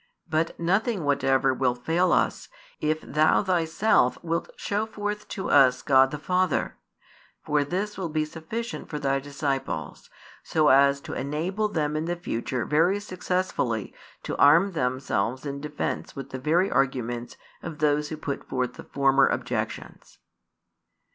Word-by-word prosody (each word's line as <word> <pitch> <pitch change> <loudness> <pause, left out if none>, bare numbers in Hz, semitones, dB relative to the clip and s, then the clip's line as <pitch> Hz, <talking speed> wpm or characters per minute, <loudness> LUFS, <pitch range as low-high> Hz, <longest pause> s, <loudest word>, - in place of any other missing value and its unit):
But 160 0 -1
nothing 195 +3 +1
whatever 135 -2 +2
will 125 -1 +1
fail 165 +8 +1
us, - - +1 0.3
if 155 +1 0
Thou 155 +6 +2
Thyself 175 - +2
wilt 165 0 -2
show 210 +2 -2
forth 210 -1 -4
to 190 - -4
us 130 -3 +5
God 135 -1 +5
the 150 - -5
Father; 180 +1 0 0.7
for 150 -1 +2
this 195 +7 -3
will 175 -3 -2
be 155 0 0
sufficient 170 +10 -6
for 150 - -4
Thy 135 -1 0
disciples, 135 - -4 0.3
so 155 -1 +2
as 140 +1 +5
to - - -7
enable 165 +10 -1
them 155 -6 -1
in 155 +1 -1
the 175 +1 -1
future 125 -7 -3
very 170 +7 +2
successfully 185 - -2 0.3
to - - -3
arm 165 +8 +6
themselves 130 - -1
in 140 0 -4
defence 150 0 -4
with 135 - -7
the 130 - -5
very 165 +8 +2
arguments 120 -3 -1 0.2
of 165 -3 -7
those 150 0 +1
who 155 - -5
put 140 -2 -4
forth 125 -1 -1
the - - -10
former 135 -1 +3
objections." - - -4
150 Hz, 150 wpm, -26 LUFS, 135-175 Hz, 0.7 s, arm